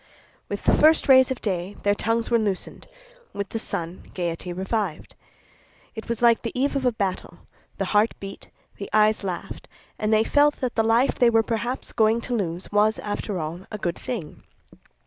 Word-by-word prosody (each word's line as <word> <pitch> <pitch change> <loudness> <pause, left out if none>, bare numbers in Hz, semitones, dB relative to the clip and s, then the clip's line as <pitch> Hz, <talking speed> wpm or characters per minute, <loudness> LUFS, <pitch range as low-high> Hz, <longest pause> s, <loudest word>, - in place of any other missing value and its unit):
With - - -4
the - - +3
first 315 +1 +5
rays 260 -1 +7
of 260 - -4
day 190 -1 -2
their 205 - +3
tongues 225 +3 -1
were 235 - +4
loosened; 200 -4 -3 0.5
with 200 -1 -4
the 225 - -3
sun 170 -3 -4
gaiety 175 0 -3
revived. 190 -1 -3 0.8
It 220 -1 -8
was 235 0 -2
like 235 -1 +5
the 235 +1 -4
eve 280 +2 +1
of 265 -2 +1
a - - +3
battle; 190 -5 -4 0.4
the 195 - -1
heart 210 +2 +3
beat, 195 0 -9 0.3
the 200 - -7
eyes 215 0 +3
laughed, 185 -3 -5 0.3
and 215 0 0
they 215 0 +4
felt 290 +4 +3
that 255 -2 -2
the 225 - +2
life 225 +4 +3
they 245 - +4
were 225 -1 +3
perhaps 235 +3 -3
going 220 +1 +3
to 245 - -4
lose, 180 -4 -3
was, 210 +1 +3
after 205 -1 -4
all, 165 +3 -5
a 210 - -5
good 175 -4 -3
thing. 225 - -6
215 Hz, 185 wpm, -24 LUFS, 190-235 Hz, 0.8 s, rays